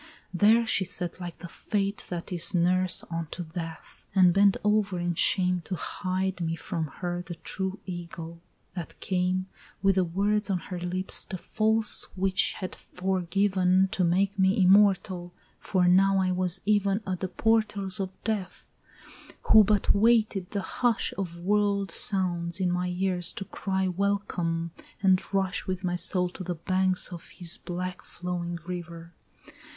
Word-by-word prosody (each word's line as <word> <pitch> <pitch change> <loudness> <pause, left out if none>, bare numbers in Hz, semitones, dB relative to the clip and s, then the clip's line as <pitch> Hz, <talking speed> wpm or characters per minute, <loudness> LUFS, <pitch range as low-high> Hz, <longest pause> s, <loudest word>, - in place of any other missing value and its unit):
There 220 +6 +4
she 210 -3 +2
sat 180 -1 -4
like 175 -1 -6
the 175 - -9
Fate 200 +3 -3
That 175 0 -5
is 170 +1 -1
nurse 180 +1 +3
unto 165 +1 -4
Death, 165 0 -8
and 180 -2 +6
bent 200 0 +4
over 210 -2 +1
in 175 0 -1
shame 180 +1 +2
To 185 - -3
hide 185 +2 -3
me 165 -1 -1
from 165 -2 -4
her 175 +4 -4
the 175 0 -7
true 190 +4 -4
Ægle 170 -2 -7 0.3
that 175 -3 -7
came 185 0 0 0.4
With 195 0 +5
the 185 - +4
words 200 +5 0
on 190 - +1
her 180 0 -7
lips 180 +2 -2
the 190 - -5
false 220 +4 +1
witch 190 0 +3
had 185 - -6
fore 185 +1 -3
given 190 0 +2
To 195 -4 0
make 195 +3 +1
me 190 +3 +3
immortal 190 -2 +3 0.3
for 185 -2 +1
now 195 +2 +5
I 185 -1 +1
was 185 0 +1
even 205 0 +2
At 185 -2 -3
the 185 - -2
portals 210 -1 +1
of 190 -1 -2
Death, 210 -4 -3 0.8
who 220 -1 +9
but 210 0 +2
waited 215 -3 +2
the 200 - -2
hush 240 +1 0
Of 175 -3 -4
world 200 +2 +1
sounds 175 -3 +1
in 180 -2 +1
my 180 0 -1
ears 180 -1 0
to 195 - -6
cry 190 -1 -2
welcome, 180 -3 -1 0.3
and 190 -1 +4
rush 195 -1 -1
With 185 0 -3
my 175 -1 0
soul 180 0 +1
to 185 - -8
the 175 0 -3
banks 185 +2 0
of 170 - -9
his 175 0 +2
black 180 +1 -5
flowing 175 -1 -5
river. 170 -1 -7
185 Hz, 160 wpm, -27 LUFS, 175-195 Hz, 0.8 s, who